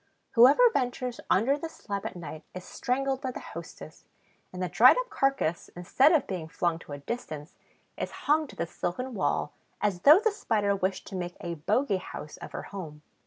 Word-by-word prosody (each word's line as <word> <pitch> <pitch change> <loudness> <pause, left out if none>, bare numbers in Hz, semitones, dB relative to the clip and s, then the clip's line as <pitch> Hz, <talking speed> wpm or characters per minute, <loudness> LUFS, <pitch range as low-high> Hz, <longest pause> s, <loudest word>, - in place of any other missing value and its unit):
Whoever 270 - +7
ventures 250 -1 -2
under 270 +9 +3
the 330 - -5
slab 200 -9 -5
at - - -8
night 165 -2 -8
is 185 0 -7
strangled 270 +1 -1
by 260 - -2
the 255 - -6
hostess; - - -10 0.5
and 180 - -8
the 185 - -1
dried 230 - +7
up - - -2
carcass, 270 -12 0
instead 260 - +3
of 315 -6 +3
being 180 -5 -5
flung 170 0 -1
to 150 - -10
a - - -5
distance, 155 - -6 0.4
is - - -2 0.2
hung 305 +1 +3
to - - -13
the 170 - -2
silken 245 +10 -4
wall, 195 - -1 0.3
as 200 -4 0
though 300 +6 +8
the 440 +1 +2
Spider 215 - 0
wished 190 0 -2
to 200 - -7
make 175 -1 -4
a 170 - -4
bogey 195 - +1
house 155 -4 -8
of - - -9
her - - -5
home. 155 -6 -8
205 Hz, 195 wpm, -28 LUFS, 175-270 Hz, 0.5 s, though